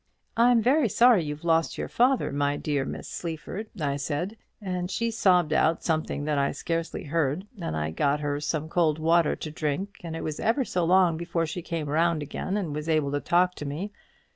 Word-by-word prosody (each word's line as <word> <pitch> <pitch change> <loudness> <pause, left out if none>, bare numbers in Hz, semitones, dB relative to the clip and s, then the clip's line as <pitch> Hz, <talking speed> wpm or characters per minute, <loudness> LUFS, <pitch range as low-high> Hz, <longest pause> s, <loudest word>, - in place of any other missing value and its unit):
'I'm 235 0 +4
very 260 0 +3
sorry 235 -3 +5
you've 150 0 -5
lost 165 -1 +1
your - - -3
father, 250 - +2
my 145 0 0
dear 145 -3 -1
Miss - - -6
Sleaford,' 175 +6 -5
I 140 -2 -1
said: 150 +8 -3 0.2
and 180 -3 -3
she 230 +4 -1
sobbed 180 -8 +3
out 160 +1 +2
something 155 -3 -1
that 150 -2 +1
I 140 - +1
scarcely 165 +2 -3
heard, 150 +3 -1 0.2
and 80 - -3
I 75 0 -2
got 140 - +1
her 145 -1 -2
some 150 +1 -2
cold 160 -2 +2
water 165 0 +3
to 155 - -6
drink, 155 +7 -3
and 165 -1 -5
it - - -5
was 155 -1 -4
ever 245 +4 +1
so 180 -5 0
long 180 -2 +4
before 170 0 -1
she 160 +3 -5
came 165 -2 -4
round 160 +1 +1
again 190 +7 -3
and 175 -8 -3
was 150 +2 -4
able 155 -3 +2
to 145 0 -1
talk 180 +1 +3
to 150 - -5
me. 170 +9 -4
165 Hz, 205 wpm, -27 LUFS, 150-185 Hz, 0.2 s, sorry